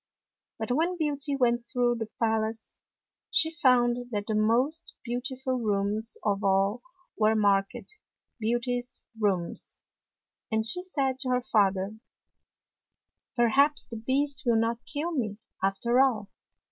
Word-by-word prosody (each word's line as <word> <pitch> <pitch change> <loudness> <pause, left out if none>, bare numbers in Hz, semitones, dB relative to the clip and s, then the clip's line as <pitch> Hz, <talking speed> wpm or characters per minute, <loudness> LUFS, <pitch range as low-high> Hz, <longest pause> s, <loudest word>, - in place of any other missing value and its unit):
But 220 +2 -3
when 335 +7 +1
Beauty 290 -3 0
went 240 -2 +2
through 240 0 0
the 225 - -3
pal 225 -1 +2
ace, 220 0 -6 0.5
she 330 -3 +2
found 245 -5 +3
that 205 -3 -3
the 215 - -2
most 240 +9 +1
beautiful 255 +1 -3
rooms 210 +1 -1
of 205 0 0
all 195 +4 +2 0.3
were 220 0 +3
marked 205 - 0 0.2
" - - -58
Beauty's 245 +2 -2 0.2
Rooms," 190 -5 -2 0.7
and 220 0 +1
she 240 +11 +4
said 275 -8 -1
to 265 - -3
her 250 0 +2
father, 200 -2 +1 0.7
" - - -62
Perhaps 275 +5 +3
the 230 - -8
Beast 265 +4 0
will 235 -3 +3
not 230 +2 -1
kill 310 +4 -2
me, 220 -10 -2 0.2
after 215 +6 +1
all. 220 -7 +1
240 Hz, 135 wpm, -28 LUFS, 215-265 Hz, 0.7 s, she